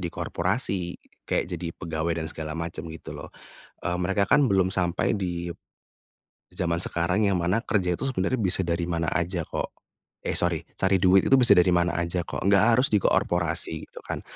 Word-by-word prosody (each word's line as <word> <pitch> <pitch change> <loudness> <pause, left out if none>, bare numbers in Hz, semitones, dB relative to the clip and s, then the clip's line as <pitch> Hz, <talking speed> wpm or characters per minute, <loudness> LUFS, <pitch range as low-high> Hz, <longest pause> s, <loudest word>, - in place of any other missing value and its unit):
di 85 - -2
korporasi 90 +1 -2 0.3
kayak - - +1
jadi 85 - -4
pegawai 85 -1 -2
dan - - -4
segala 80 -1 -6
macam 85 0 -5
gitu 80 -1 -8
loh. - - -8 0.6
Eee, 90 0 0
mereka 95 +3 +1
kan 140 +3 +4
belum 95 -1 +2
sampai 90 +1 0
di, 85 -4 -3 1.0
zaman 85 -1 -1
sekarang 90 +6 0
yang 95 - +1
mana 90 +7 +1
kerja 90 -6 0
itu - - -3
sebenarnya 125 +2 -1
bisa 95 -1 +2
dari 85 0 -1
mana 85 -2 -1
aja 90 0 -1
kok, - - -4 0.5
eh, - - -2
sorry 85 -2 +2 0.2
cari 95 -1 +2
duit 95 +1 +5
itu - - +3
bisa 115 -6 +6
dari 90 +1 +5
mana 85 0 +2
aja 85 +1 -1
kok - - -5
nggak 100 +1 +5
harus 130 - +3
di 105 - +5
korporasi 85 -3 0
gitu - - -11
kan. - - -4
90 Hz, 185 wpm, -26 LUFS, 85-95 Hz, 1.0 s, bisa